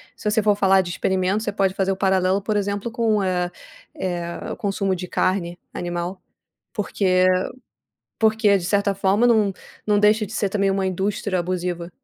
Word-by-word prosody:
se 210 Hz, -, -2 dB
você 215 Hz, 0 st, +1 dB
for 210 Hz, -1 st, +4 dB
falar 195 Hz, -1 st, +4 dB
de 175 Hz, -1 st, -5 dB
experimentos, 190 Hz, +4 st, 0 dB
você 210 Hz, -, -1 dB
pode 195 Hz, -1 st, +1 dB
fazer 195 Hz, 0 st, 0 dB
o 190 Hz, -, -2 dB
paralelo, 190 Hz, 0 st, +2 dB
por 210 Hz, +2 st, -2 dB
exemplo, 205 Hz, +2 st, -2 dB
com 225 Hz, -1 st, +1 dB
o, 200 Hz, -, 0 dB
é 180 Hz, -1 st, 0 dB, 0.5 s
eh, 175 Hz, -2 st, -3 dB
o -, -, -4 dB
consumo 195 Hz, -2 st, -1 dB
de 180 Hz, 0 st, -6 dB
carne 175 Hz, -1 st, -1 dB, 0.2 s
animal, 175 Hz, +1 st, -4 dB, 0.5 s
porque, 210 Hz, -1 st, -3 dB
eh, 185 Hz, 0 st, +4 dB, 0.8 s
porque 220 Hz, -2 st, +4 dB
de 175 Hz, -, -6 dB
certa 200 Hz, +2 st, +1 dB
forma 195 Hz, +4 st, +2 dB
não 215 Hz, -4 st, +3 dB, 0.3 s
não 210 Hz, -1 st, +3 dB
deixa 210 Hz, +1 st, +4 dB
de 205 Hz, -, -11 dB
ser 205 Hz, -2 st, 0 dB
também 200 Hz, -1 st, +1 dB
uma 195 Hz, 0 st, 0 dB
indústria 190 Hz, +1 st, -1 dB
abusiva. 175 Hz, -1 st, -3 dB
195 Hz, 185 wpm, -22 LUFS, 185-205 Hz, 0.8 s, for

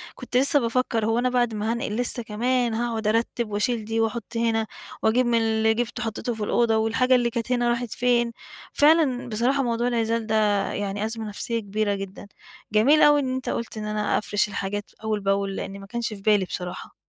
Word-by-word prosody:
كنت 250 Hz, -1 st, -3 dB
لسّه 280 Hz, +3 st, +4 dB
بافكّر 230 Hz, -2 st, 0 dB
هو 225 Hz, +2 st, +1 dB
أنا 255 Hz, +1 st, +1 dB
بعد 240 Hz, -2 st, +1 dB
ما 215 Hz, +1 st, -1 dB
هانقِل 230 Hz, -2 st, -2 dB
لسّه 245 Hz, 0 st, -1 dB
كمان 240 Hz, +2 st, 0 dB
هاقعد 225 Hz, -1 st, -2 dB
أرتّب 230 Hz, +1 st, 0 dB
وأشيل 220 Hz, +2 st, -1 dB
دي 225 Hz, +1 st, -1 dB
وأحُط 225 Hz, 0 st, 0 dB
هنا 225 Hz, -1 st, +1 dB, 0.4 s
وأجيب 240 Hz, +3 st, +3 dB
من 235 Hz, -1 st, +2 dB
اللي 220 Hz, 0 st, +2 dB
جِبته 240 Hz, +1 st, -3 dB
وحطّيته 225 Hz, +2 st, -3 dB
في 220 Hz, -2 st, -5 dB
الأوضة 225 Hz, +1 st, +2 dB
والحاجة 230 Hz, +4 st, +3 dB
اللي 240 Hz, -1 st, +2 dB
كانت 235 Hz, +2 st, -4 dB
هنا 240 Hz, -1 st, +2 dB
راحت 240 Hz, -1 st, -1 dB
فين؟ 240 Hz, -1 st, +2 dB, 0.4 s
فعلًا 290 Hz, -5 st, +3 dB
بصراحة 250 Hz, +6 st, +1 dB
موضوع 235 Hz, 0 st, 0 dB
العِزال 230 Hz, -1 st, 0 dB
ده 220 Hz, -, 0 dB, 0.4 s
يعني 200 Hz, +1 st, -2 dB
أزمة 225 Hz, 0 st, -4 dB
نفسية 230 Hz, +3 st, -3 dB
كبيرة 205 Hz, 0 st, -1 dB
جدًا. 195 Hz, +1 st, -8 dB, 0.5 s
جميل 275 Hz, +9 st, +5 dB
أوي 295 Hz, 0 st, +6 dB
إن 260 Hz, -2 st, -1 dB
أنت 260 Hz, -, -4 dB
قُلت 230 Hz, -1 st, -4 dB
إن 215 Hz, -, -4 dB
أنا 210 Hz, 0 st, 0 dB
أفرِش 210 Hz, 0 st, 0 dB
الحاجات 205 Hz, 0 st, -4 dB
أول 215 Hz, -1 st, -1 dB
بأول، 195 Hz, 0 st, 0 dB
لإنّي 195 Hz, +1 st, -5 dB
ما 195 Hz, -, -10 dB
كانش 235 Hz, +1 st, -3 dB
في 200 Hz, -, -10 dB
بالي 205 Hz, -2 st, +3 dB
بصراحة. 180 Hz, 0 st, -6 dB
225 Hz, 195 wpm, -24 LUFS, 210-245 Hz, 0.5 s, أوي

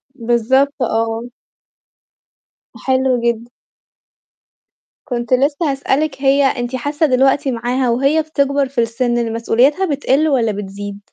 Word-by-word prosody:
بالضبط 260 Hz, +4 st, +1 dB
آه. 225 Hz, 0 st, -1 dB, 1.6 s
حلو 260 Hz, -1 st, +1 dB
جدًا. 235 Hz, 0 st, -1 dB, 1.6 s
كنت 240 Hz, -1 st, -2 dB
لسّه 285 Hz, +3 st, +1 dB
هاسألِك 275 Hz, +1 st, -1 dB
هي 275 Hz, +1 st, +3 dB
أنتِ 245 Hz, -1 st, -1 dB
حاسة 290 Hz, +5 st, -1 dB
دلوقتي 270 Hz, +1 st, +2 dB
معاها 245 Hz, +2 st, -1 dB
وهي 275 Hz, +6 st, +2 dB
بتكبر 280 Hz, -3 st, 0 dB
في 255 Hz, -3 st, 0 dB
السِنّ 240 Hz, +1 st, -1 dB
إن 230 Hz, -1 st, -1 dB
مسؤولياتها 255 Hz, +10 st, +2 dB
بتقِلّ 285 Hz, 0 st, +1 dB
والَّا 240 Hz, -7 st, +1 dB
بتزيد؟ 200 Hz, 0 st, -7 dB
260 Hz, 115 wpm, -17 LUFS, 235-280 Hz, 1.6 s, هي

